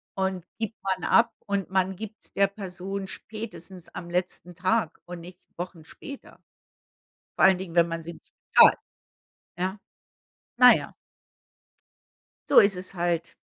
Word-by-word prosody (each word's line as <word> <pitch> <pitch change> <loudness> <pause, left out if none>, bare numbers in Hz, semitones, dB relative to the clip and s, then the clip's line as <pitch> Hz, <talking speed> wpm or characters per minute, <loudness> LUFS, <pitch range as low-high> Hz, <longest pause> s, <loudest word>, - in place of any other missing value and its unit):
und 190 -2 -2
gibt 225 -1 -5
man 190 -1 -2
ab 230 0 +4
und 200 -2 -2
man 190 0 0
gibt's 215 +1 -9
der 200 0 +3
Person 195 0 -6
spätestens 195 -5 -8
am 170 - -7
letzten 180 0 -3
Tag 185 0 0
und 175 0 -8
nicht 175 +2 -12 0.2
Wochen 175 -2 -6
später. 280 - -11 1.0
Vor - - +5
allen 190 -1 +5
Dingen, 185 -3 -7
wenn 170 -1 +4
man 165 0 -4
sie 170 +1 -7
nicht - - -21 0.2
zahlt. - - +8 0.8
Ja. 190 +3 -2 0.8
Naja. 250 0 +6 1.6
So - - +6
ist 200 -2 +3
es 185 +1 -8
halt. 170 -1 -1
185 Hz, 140 wpm, -26 LUFS, 175-200 Hz, 1.6 s, zahlt